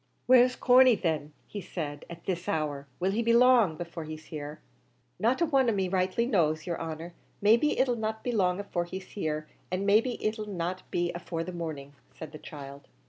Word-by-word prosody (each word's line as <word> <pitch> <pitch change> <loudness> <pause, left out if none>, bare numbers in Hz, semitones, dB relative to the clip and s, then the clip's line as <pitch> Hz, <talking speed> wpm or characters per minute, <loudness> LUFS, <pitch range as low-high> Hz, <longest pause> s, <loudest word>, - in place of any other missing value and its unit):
"Where's 250 0 +6
Corney, 255 -1 +6
then," 155 -5 -2
he 205 - -7
said, 145 -6 -5
"at 170 0 -10
this 185 +1 -2
hour? 145 -6 -2
Will 185 +2 +1
he 220 +4 0
be 230 0 +3
long 235 -9 +5
before 170 -1 -6
he's 155 0 -8
here?" 150 -1 -7 0.6
"Not 235 - +2
a - - +5
one 270 -6 +3
of 220 - +1
me 190 -2 0
rightly 185 +4 +1
knows, 160 - +1
yer 175 - -2
honer; 165 +1 -6 0.3
maybe 230 +8 +4
it 260 - +3
'll 245 - +1
not 220 0 -3
be 245 - -1
long 185 -4 +1
afore 175 -4 -2
he's 190 +2 -8
here, 155 -5 -3 0.2
and 185 +2 -2
maybe 220 +5 +4
it 215 -1 -2
'll 210 - -4
not 185 -1 -3
be 175 0 -1
afore 170 -1 -4
the 185 - -6
morning," 155 -5 -6 0.2
said 160 -2 -8
the 155 - -10
child. 140 -1 -10
185 Hz, 205 wpm, -29 LUFS, 160-220 Hz, 0.6 s, Where's